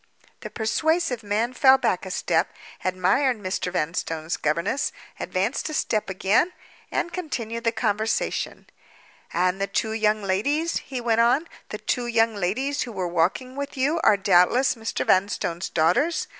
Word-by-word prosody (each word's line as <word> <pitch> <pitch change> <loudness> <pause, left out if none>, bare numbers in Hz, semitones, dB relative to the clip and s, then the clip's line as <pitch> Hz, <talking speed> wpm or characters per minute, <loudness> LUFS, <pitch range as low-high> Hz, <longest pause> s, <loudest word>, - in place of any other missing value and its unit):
The - - -7
persuasive 310 +3 0
man 215 +4 -1
fell 265 0 +6
back - - -1
a - - -5
step—admired 190 +8 0
Mr. 185 -2 -3
Vanstone's 165 -1 -2
governess—advanced 170 - -2
a 310 - -4
step 215 -9 0
again—and 220 - -1
continued 235 -10 -4
the 230 - +3
conversation. 220 0 -1 0.7
"And 180 +2 0
the 195 - +1
two 220 - -1
young 215 -1 +1
ladies," 285 - 0
he 260 -2 -5
went 230 -1 +2
on, 250 +8 +3 0.2
"the - - -4
two 245 -2 -2
young 230 -1 +2
ladies 225 +9 -1
who 245 - -3
were 185 -4 -3
walking 180 +10 0
with 280 0 -5
you 290 +6 +1
are 205 - +5
doubtless 195 +7 +4
Mr. 225 -2 -3
Vanstone's 185 -2 +1
daughters? 245 - +2
225 Hz, 140 wpm, -24 LUFS, 190-265 Hz, 0.7 s, fell